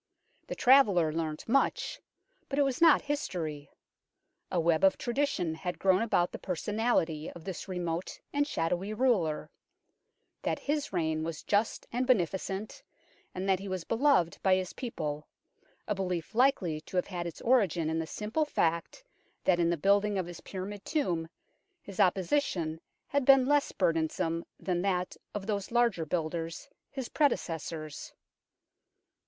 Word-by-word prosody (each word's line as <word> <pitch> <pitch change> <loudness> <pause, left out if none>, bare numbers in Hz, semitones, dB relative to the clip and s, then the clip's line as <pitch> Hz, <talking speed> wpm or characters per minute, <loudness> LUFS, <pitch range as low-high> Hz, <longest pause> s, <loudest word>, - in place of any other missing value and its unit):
The - - -4
traveller 200 - +5
learnt 155 -2 -3
much, 275 - +1 0.5
but 275 - -2
it 290 - +5
was 270 0 -1
not 325 -3 +7
history. 165 - -3 0.8
A 180 - +1
web 165 0 +2
of 195 - +5
tradition 240 - -1
had 175 +2 -4
grown 190 0 +3
about 195 -6 +2
the - - -7
personality 180 -4 0
of 170 - -11
this 190 +1 -6
remote 175 -2 -3
and 290 0 +2
shadowy 185 - -1
ruler: 195 -12 +1 0.9
that - - -1
his 295 0 -2
reign 160 -3 0
was 160 -1 -5
just 210 +2 0
and 250 +2 -1
beneficent, 195 - 0 0.5
and 185 +1 -3
that 190 -1 +3
he 200 - -7
was 185 -2 -3
beloved 230 - +2
by 190 -1 +4
his 185 -1 -3
people 155 - -4 0.6
a 210 - +1
belief 185 -1 -3
likely 220 - +2
to 180 - -6
have 180 - +2
had 175 -3 -4
its 170 - -8
origin 195 -10 +2
in 160 +1 0
the 160 - -3
simple 215 - -1
fact 170 - -1 0.4
that 180 -2 +3
in 170 -1 +3
the 170 - +1
building 200 +4 +3
of 185 - -1
his 175 -1 -9
pyramid 195 +1 -6
tomb 175 - -1 0.5
his 200 -2 -11
oppression 180 - +1 0.3
had 285 0 +1
been 270 0 +7
less 290 +1 +2
burdensome 165 0 0 0.2
than 180 -2 -1
that 180 -2 -1 0.2
of 200 -2 -3
those 200 -2 -2
larger 230 -9 +2
builders, 165 0 -3 0.2
his 265 -3 -5
prede 295 -2 +3
cessors. 160 -2 -6
185 Hz, 150 wpm, -30 LUFS, 165-235 Hz, 0.9 s, not